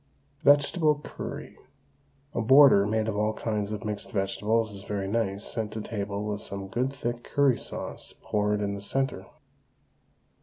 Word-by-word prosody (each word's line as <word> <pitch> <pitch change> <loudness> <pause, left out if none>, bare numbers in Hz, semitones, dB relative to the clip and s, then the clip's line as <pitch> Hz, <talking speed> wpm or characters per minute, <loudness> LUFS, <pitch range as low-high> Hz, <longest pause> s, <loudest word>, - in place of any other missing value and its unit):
VEGETABLE 145 +1 +4
CURRY. - - -7 0.7
A 120 - 0
border 130 -4 +7
made 110 +1 0
of 110 - -1
all 105 +1 +1
kinds 105 -2 -2
of 105 +1 -5
mixed 105 -1 -4
vegetables 105 +3 0
is 100 -1 -8
very 100 -1 -3
nice 100 -2 -1
sent 110 -2 -3
to 110 - -4
table 105 -1 -4
with 105 -1 -3
some 100 -1 -6
good 125 +6 0
thick 120 -3 -4
curry 140 -3 +3
sauce - - -6
poured 105 0 0
in 100 -1 -1
the 100 - -6
centre. 135 +6 -1
105 Hz, 155 wpm, -27 LUFS, 100-120 Hz, 0.7 s, border